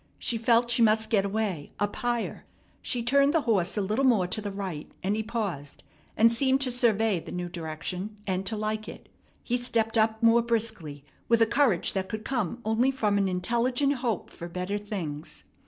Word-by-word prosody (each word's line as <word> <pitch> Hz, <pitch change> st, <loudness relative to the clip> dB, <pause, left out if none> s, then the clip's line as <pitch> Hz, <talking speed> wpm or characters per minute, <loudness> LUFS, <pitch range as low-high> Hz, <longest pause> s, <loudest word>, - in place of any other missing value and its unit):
She 230 Hz, -, -1 dB
felt 235 Hz, +1 st, +3 dB
she 235 Hz, -, +2 dB
must 220 Hz, 0 st, +3 dB
get 200 Hz, -3 st, +3 dB
away, 200 Hz, -7 st, -2 dB
up 205 Hz, 0 st, -1 dB
higher. 240 Hz, -1 st, -2 dB, 0.4 s
She 240 Hz, -2 st, -1 dB
turned 280 Hz, +5 st, +3 dB
the 325 Hz, -, +4 dB
horse 210 Hz, -6 st, +1 dB
a 205 Hz, -, +1 dB
little 215 Hz, +7 st, 0 dB
more 230 Hz, -8 st, +4 dB
to 185 Hz, +4 st, -1 dB
the 205 Hz, -, -4 dB
right, 190 Hz, -6 st, -6 dB
and 200 Hz, +3 st, +1 dB
he 220 Hz, -, -1 dB
paused, 200 Hz, -11 st, -4 dB, 0.3 s
and 230 Hz, +1 st, +5 dB
seemed 265 Hz, +2 st, +2 dB
to 260 Hz, -2 st, +1 dB
survey 225 Hz, -5 st, +2 dB
the -, -, -10 dB
new 180 Hz, 0 st, -3 dB
direction 180 Hz, +5 st, -5 dB
and 185 Hz, -1 st, -1 dB
to 220 Hz, -, 0 dB
like 215 Hz, +1 st, -3 dB
it. -, -, -12 dB, 0.3 s
He 245 Hz, -, 0 dB
stepped 230 Hz, -2 st, +1 dB
up 220 Hz, +1 st, +1 dB
more 230 Hz, +1 st, +6 dB
briskly, 220 Hz, -12 st, -2 dB, 0.2 s
with 230 Hz, -1 st, +4 dB
a 225 Hz, -, +6 dB
courage 230 Hz, -6 st, +2 dB
that 190 Hz, -1 st, -2 dB
could 220 Hz, 0 st, -5 dB
come 240 Hz, -3 st, -2 dB
only 225 Hz, +4 st, +2 dB
from 215 Hz, -7 st, +1 dB
an 195 Hz, -, +2 dB
intelligent 240 Hz, +9 st, +1 dB
hope 235 Hz, -6 st, -2 dB
for 170 Hz, -, -8 dB
better 180 Hz, +4 st, -3 dB
things. 175 Hz, -8 st, -6 dB
220 Hz, 195 wpm, -27 LUFS, 190-235 Hz, 0.4 s, more